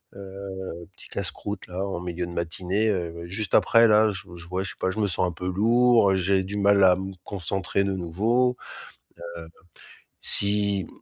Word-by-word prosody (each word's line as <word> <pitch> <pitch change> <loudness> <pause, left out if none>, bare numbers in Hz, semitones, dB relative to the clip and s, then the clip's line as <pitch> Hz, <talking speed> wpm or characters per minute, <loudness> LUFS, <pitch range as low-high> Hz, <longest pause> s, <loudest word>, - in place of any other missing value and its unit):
Heu, 95 -3 -8
petit - - -12
casse-croûte, 100 -1 -5
là, 90 +2 -4
en 95 -3 -3
milieu 90 0 -4
de - - -8
matinée, 90 +5 -1
heu, 85 -3 -3
juste 95 +3 -2
après, 115 0 +5
là, 110 0 +5
je 95 - -6 0.2
j 85 - -12
ouais, 95 +1 -1
je 95 - -4
sais - - -7
pas, 95 - 0
je 105 - -5
me 105 - +2
sens 90 0 +1
un - - -3
peu 90 +2 -5
lourd, 115 0 +4
j'ai 95 +1 +2
du 100 +2 -5
mal 100 -1 +4
à 90 -1 +7
me 95 +1 -5
concentrer 95 +1 -1
de 100 0 -1
nouveau. 110 +9 +1 0.8
Heu, 80 - -9 0.7
si, 100 -2 0
95 Hz, 185 wpm, -25 LUFS, 90-100 Hz, 0.8 s, à